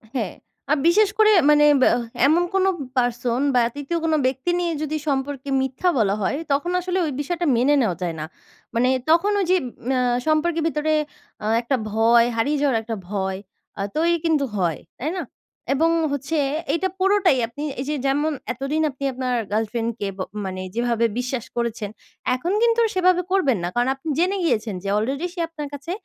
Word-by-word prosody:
হ্যাঁ। 220 -8 -2 0.4
আ - - +6
বিশেষ 410 +4 +5
করে 430 0 +6 0.2
মানে 295 0 +6 0.2
ব্যাহ 245 - +5 0.3
এমন 330 +4 +4
কোন 385 -1 +3 0.3
person 245 0 0
বা 245 - +5
৩য় 290 +4 -3
কোন 325 -1 +1
ব্যক্তি 265 +6 0
নিয়ে 345 -1 0
যদি 310 0 -2
সম্পর্কে 275 0 -2
মিথ্যা 265 +7 0
বলা 200 -4 +2
হয়, 240 +8 0
তখন 285 +6 +1
আসলে 360 +1 -2
ওই 305 - -2
বিষয়টা 345 +4 -2
মেনে 260 +5 +3
নেওয়া 205 -8 +1
যায় 170 -2 -2
না। 155 - -3 0.5
মানে 245 +2 +3 0.2
তখন 340 +6 +4
ওই 390 - +1
যে - - +6 0.3
ম্যা 260 -1 +2 0.3
সম্পর্কের 315 +1 +1
ভিতরে 310 0 0 0.5
আ - - -3 0.2
একটা 255 +3 0 0.2
ভয় 230 +1 +5
হারিয়ে 285 +7 +1
যাওয়ার 270 -6 +2
একটা 225 0 -4
ভয় 190 -2 -2 0.4
আ - - -1
তৈরি 335 +2 +2
কিন্তু 310 -4 +2
হয়, 170 -6 0 0.2
তাই 305 +6 -2
না? 350 - -2 0.5
এবং 320 +4 +2 0.2
হচ্ছে 285 +3 -2 0.4
এইটা 335 +4 +1
পুরোটাই 385 -6 +3
আপনি 285 +6 -8 0.2
এই 260 - -2
যে 300 - 0
যেমন 290 +3 +1 0.2
এতদিন 275 +5 -2
আপনি 270 0 -9
আপনার 255 0 -2 0.2
girlfriend 225 +2 -1
কে 205 - -2
ব - - -16 0.3
মানে 185 -1 -4
যেভাবে 235 -1 +1
বিশ্বাস 250 -1 -3
করেছেন, 235 -3 -2 0.5
এখন 335 +8 -2
কিন্তু 470 0 +3
সেভাবে 365 -1 +3
করবেন 285 - +3
না। - - 0
কারণ 245 +1 +2
আপনি 275 +4 -7
জেনে 370 +3 +2
গিয়েছেন 215 - 0
যে - - -5
already 270 +9 -1
সে 365 - -8
আপনার 300 -3 -6
কাছে 285 +4 -6
275 Hz, 180 wpm, -22 LUFS, 235-330 Hz, 0.5 s, আ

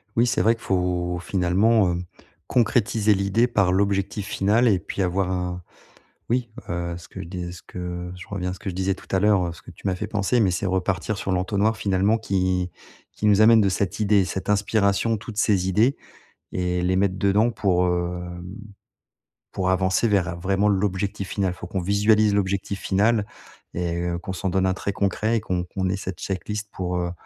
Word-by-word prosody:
Oui, 120 - +4
c'est 120 - +1
vrai 115 +2 +4
qu'il 115 - -17
faut, 90 -1 0
finalement, 95 +3 +2
heu, 85 - -2 0.5
concrétiser 110 -2 +2
l'idée 100 +5 +2
par 100 -6 +2
l'objectif 100 +1 0
final 105 +4 +2
et 100 -5 +3
puis, 100 - -5
avoir 95 0 0
un 90 -1 -3 0.7
oui, 120 -1 0 0.2
heu, 85 0 -3
ce 85 - -12
que - - -8
je - - -8
dis 90 -1 -5
ce 90 - -11
que 90 0 -6
je 90 - -10
reviens 90 -3 -3
à - - -3
ce 95 - -9
que 100 - -5
je - - -9
disais 95 +1 0
tout - - -16
à - - +3
l'heure, 100 -2 +3
heu, 85 - -4
ce 85 - -15
que - - -13
tu - - -18
m'as 95 - +1
fait - - -4
penser, 105 +3 +1
mais, 100 -5 +3
c'est 90 - -2
repartir 95 +2 -1
sur 95 - -3
l'entonnoir, 100 +4 +1
finalement, 100 +3 +2
qui 95 -4 0 0.4
qui 105 - -1
nous 105 -1 +5
amène 110 0 +7
de 100 - +3
cette 95 +2 -1
idée, 100 -2 +4
cette 95 +2 -4
inspiration, 105 +1 +2
toutes 110 0 -8
ces 95 -4 +2
idées 110 +8 +3 0.6
et 90 -1 -1
les 90 +1 +1
mettre 95 -1 +1
dedans 105 +4 +3
pour, 90 -5 +1
hem, 90 0 -3 1.1
pour 95 -1 0
avancer 95 +4 +2
vers, 90 -4 +1
vraiment, 95 +3 +1
l'objectif 100 -1 -1
final. 95 -3 -1
Faut 90 - -9
qu'on 95 - -3
visualise 105 +3 +3
l'objectif 100 0 -1
final 105 +2 +2 0.5
et 85 -1 -2
heu, 85 0 -1
qu'on 95 +2 -6
s'en 95 +1 -2
donne 95 +1 +1
un 95 - +2
très 100 - -3
concret 105 +4 0
et - - +1
qu'on 90 -4 -2
qu'on 95 +1 -3
ait 95 - 0
cette 95 -3 -6
check-list 105 +2 -4
pour, 90 -1 -3
heu, 85 0 -1
95 Hz, 205 wpm, -24 LUFS, 90-105 Hz, 1.1 s, amène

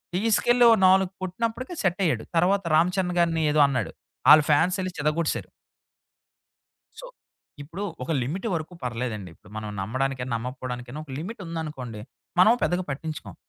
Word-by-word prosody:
తీసుకెళ్ళి 230 +4 +3
ఓ - - +8
నాలుగు 190 0 +4
కొట్టినప్పటికే 230 - -3
సెట్టయ్యాడు. 185 -2 +1
తర్వాత 195 +4 +3
'రామ 165 +3 +5
చరణ్' 180 -2 0
గారిని 165 -2 +2
ఏదో 150 - +2
అన్నాడు. 135 -2 -2 0.4
ఆళ్ళు 155 0 +9
ఫ్యాన్సెళ్లి 185 +5 +2
చితకొట్టేశారు. 150 +2 -1 1.5
సో. - - -9 0.6
ఇప్పుడు 170 +7 -7 0.2
ఒక 145 - -4
లిమిట్ 175 - -3
వరకు 165 +1 -4
పర్లేదండి. 115 -5 -4
ఇప్పుడు 100 - -20
మనం 110 -1 -5
నమ్మడానికేనా 130 +4 -2
నమ్మకపోవడానికేనా. 125 +2 -6
ఒక 140 - -11
లిమిట్ 205 +9 -7
ఉందనుకోండి 150 -9 -6 0.4
మనము 215 +6 +7
పెద్దగా 180 +1 +1
పట్టించుకోం. 155 +3 -6
160 Hz, 135 wpm, -25 LUFS, 130-185 Hz, 1.5 s, ఆళ్ళు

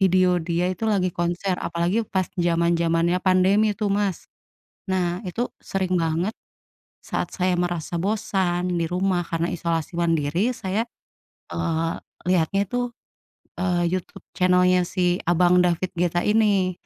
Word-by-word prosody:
video 185 -1 +4
dia 170 +1 0
itu 185 +5 -5
lagi 190 -4 +1
konser. 175 +2 -1
Apalagi 170 +6 0
pas 185 -1 -1
jaman-jamannya 170 0 +2
pandemi 190 +3 +4
tuh, 210 - -1
Mas. 200 -3 -1 0.6
Nah, 180 0 0
itu 230 +8 -1 0.2
sering 190 -1 -1
banget 165 +6 0 0.7
saat - - -3
saya 185 -1 +1
merasa 175 -1 -2
bosan 185 -3 0
di 165 - +1
rumah 180 0 +1
karena 165 0 0
isolasi 165 -1 -2
mandiri, 165 - +1
saya, 210 +2 -2 0.7
eee, 165 0 -1 0.3
liatnya 185 +2 +2
tuh, 245 0 0 0.8
eee, 175 -2 +1
YouTube 185 -1 -4
channel-nya 180 0 +4
si 180 -2 +1
abang 180 +1 +4
David 175 +1 0
Guetta 175 0 +1
ini. 205 -4 +2
180 Hz, 130 wpm, -24 LUFS, 170-190 Hz, 0.8 s, video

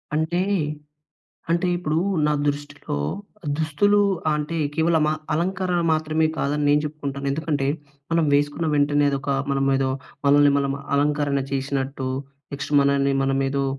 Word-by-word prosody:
అంటే, 160 +3 0 1.1
అంటే 170 +2 +2
ఇప్పుడూ 160 -3 -1 0.3
నా 150 - +2 0.2
దృష్టిలో 145 - -4 0.6
దుస్తులు 160 +7 +3 0.3
అంటే 150 +2 -2 0.2
కేవలం 160 0 +2
అ - - +2 0.2
అలంకరణ 180 +1 0
మాత్రమే 155 0 +1
కాదని 145 +1 0
నేను 145 +1 +4
చెప్పుకుంటాను. 140 -2 -5
ఎందుకంటే, 145 -2 -1 0.4
మనం 165 -1 +3
వేసుకున్న 145 +3 +1
వెంటనే 145 0 +3
అదొక 140 0 -2 0.2
మనమేదో 135 -1 +1 0.4
మనల్ని 145 0 +6
మనం 140 -1 0 0.2
అలంకరణ 145 -1 +1
చేసినట్టు, 135 -1 -2 0.4
నెక్స్ట్ 140 +1 -5
మనల్ని 140 0 +2
మనమేదో 135 0 0
145 Hz, 120 wpm, -23 LUFS, 140-160 Hz, 1.1 s, మనల్ని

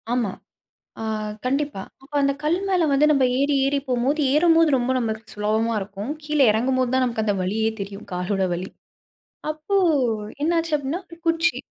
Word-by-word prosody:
ஆமா. 240 -4 +1 0.7
ஆ - - -4 0.4
கண்டிப்பா. 275 -5 -1 0.2
அப்ப 275 - -19
அந்த 275 0 +3
கல்லு 315 +4 +1
மேல 360 -4 +3
வந்து 280 +2 +4
நம்ப 275 -3 +4
ஏறி 280 +1 +2
ஏறி 280 +1 +1
போம்போது 260 +5 +1
ஏறும்போது 330 +1 +5
ரொம்ப 250 0 -1
நம்மளுக்கு 225 -1 -4
சுலபமா 220 +2 0
இருக்கும். 200 +4 -6
கீழ 300 0 -1
இறங்கும்போது 255 +3 +1
தான் 260 0 +3
நமக்கு 230 -3 -1
அந்த 205 -2 +1
வலியே 220 +4 0
தெரியும், 200 +1 -7
காலோட 180 +2 -1
வலி. 180 +2 -4 0.8
அப்போ 310 +6 -2 0.7
என்ன 325 +3 +2
ஆச்சு 330 -1 -1
அப்படீன்னா, 290 +5 -3
1 - - -22
குச்சி 330 +1 +2
260 Hz, 165 wpm, -23 LUFS, 220-300 Hz, 0.8 s, ஏறும்போது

